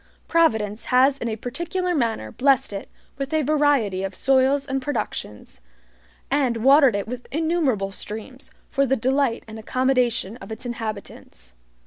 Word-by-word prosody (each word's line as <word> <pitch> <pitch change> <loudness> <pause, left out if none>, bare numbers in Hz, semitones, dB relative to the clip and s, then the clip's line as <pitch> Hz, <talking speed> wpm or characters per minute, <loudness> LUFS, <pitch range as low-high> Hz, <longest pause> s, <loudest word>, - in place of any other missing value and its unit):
Providence 220 -11 +1
has 265 +2 +3
in 240 - -3
a 220 - -2
particular 345 - -2
manner 225 - -1
blessed 270 - +2
it 195 - -6 0.3
with 275 +1 -3
a 310 - +2
variety 280 -10 +2
of 195 -1 -4
soils 270 +1 +2
and 270 -1 -2
productions, 215 - -5 0.7
and 255 -5 +1
watered 275 -3 +6
it 200 0 -2
with 250 +1 -7
innumerable 300 - 0
streams, 220 +7 -7 0.2
for 275 0 +2
the 265 - +2
delight 260 0 0
and 220 0 -9
accommodation 250 -3 0
of 240 - -11
its 220 +3 -7
inhabitants. 215 - -7
255 Hz, 145 wpm, -23 LUFS, 220-275 Hz, 0.7 s, watered